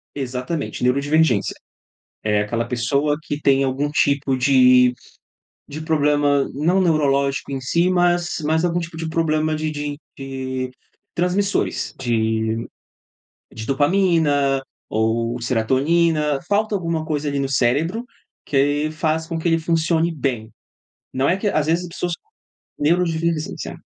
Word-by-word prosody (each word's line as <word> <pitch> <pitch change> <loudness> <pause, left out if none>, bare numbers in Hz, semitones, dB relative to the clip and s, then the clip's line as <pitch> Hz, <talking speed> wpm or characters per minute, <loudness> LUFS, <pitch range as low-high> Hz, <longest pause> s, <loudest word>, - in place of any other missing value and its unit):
Exatamente, 135 +3 -4
neurodivergência. 140 -3 +2 0.7
É 105 -1 +2
aquela 115 +2 -2
pessoa 140 +5 0
que 150 -2 -4
tem 135 -1 +3
algum 135 +2 -1
tipo 140 -2 +1
de 125 -1 +5 0.8
de 155 +2 -6
problema, 145 -3 +2
não 165 +7 +1
neurológico 140 -5 +1
em 135 - -2
si, 170 +7 +1
mas 175 -1 +1
mas 160 +2 +1
algum 175 0 +1
tipo 165 -1 -7
de 160 0 -4
problema 155 -1 0
de 155 0 -2
de 145 -1 -4 0.2
de 130 -1 -4 0.4
transmissores, 185 +3 0
de 110 -2 0 0.9
de 110 - -7
dopamina 145 -3 +2 0.3
ou 115 +2 0
serotonina. 145 +6 +1
Falta 210 +1 +1
alguma 165 -4 -1
coisa 150 -2 -2
ali 140 0 -1
no 135 -1 -1
cérebro 145 - +1 0.4
que 145 +2 +1
faz 160 0 -1
com 165 0 -4
que 165 +1 -1
ele 165 - +3
funcione 165 +1 +1
bem. 125 -7 -3 0.6
Não 130 +3 +1
é 185 - +2
que 205 - -2
às 155 -6 +1
vezes 170 +2 +1
as 175 - -7
pessoas 175 0 -3 0.7
neurodivergência. 165 +1 0
145 Hz, 130 wpm, -21 LUFS, 130-165 Hz, 0.9 s, de